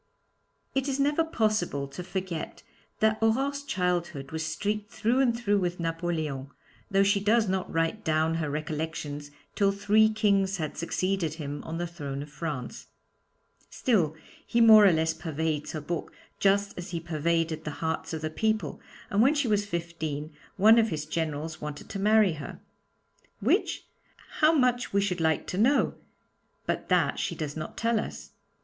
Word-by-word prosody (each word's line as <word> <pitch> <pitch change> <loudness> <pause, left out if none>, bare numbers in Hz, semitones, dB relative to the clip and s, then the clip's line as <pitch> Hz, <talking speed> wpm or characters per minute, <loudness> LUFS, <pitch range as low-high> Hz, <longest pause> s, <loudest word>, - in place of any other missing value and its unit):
It 270 +1 0
is 275 0 -1
never 290 +3 +3
possible 215 - 0
to 180 +6 -7
forget 185 -3 -5 0.4
that 220 0 +3
Aurore's 270 +6 +1
childhood 175 - -2
was 160 0 -3
streaked 205 +6 -2
through 230 +4 +1
and 240 -3 +3
through 205 -4 +1
with 180 -1 -2
Napoleon, 165 -5 -2 0.4
though 195 0 +4
she 200 0 +3
does 215 +2 +3
not 190 0 -1
write 165 +6 0
down 160 +1 +1
her 150 - -1
recollections 150 -1 -4 0.2
till 200 -1 +3
three 210 +2 +4
kings 200 -3 +2
had 155 -3 -4
succeeded 175 -1 -1
him 145 -2 -5
on 160 +1 -4
the 175 - -2
throne 145 -5 -5
of 145 - -13
France. 145 -6 -5 0.8
Still, 180 - +1 0.3
he 235 - 0
more 220 -3 +9
or - - +6
less 160 0 +1
pervades 160 -1 -3
her 155 - -4
book 165 +3 -4 0.3
just 200 +1 +2
as 175 - -7
he 170 -1 -3
pervaded 165 0 -1
the 150 - -4
hearts 160 -1 -2
of 160 -1 -4
the 155 - -2
people, 220 +5 -1 0.3
and 205 +1 +3
when 275 +6 +5
she 285 -4 +1
was 205 -2 +1
fifteen 160 -4 -4 0.2
one 220 +4 +7
of 225 -1 +3
his 150 -2 -3
generals 155 0 -3
wanted 150 -1 -6
to 195 - -4
marry 210 -2 +4
her. 150 -2 -8 0.8
Which? - - +1 0.5
How 310 0 +6
much 250 -7 +1
we 200 - +3
should 180 -4 -1
like 160 -1 +1
to 185 - -3
know! 265 +7 +3 0.7
But - - -2
that - - +2
she - - -2
does 150 -3 -4
not 155 -1 -6
tell 230 -1 +1
us. - - -7
175 Hz, 170 wpm, -28 LUFS, 160-215 Hz, 0.8 s, more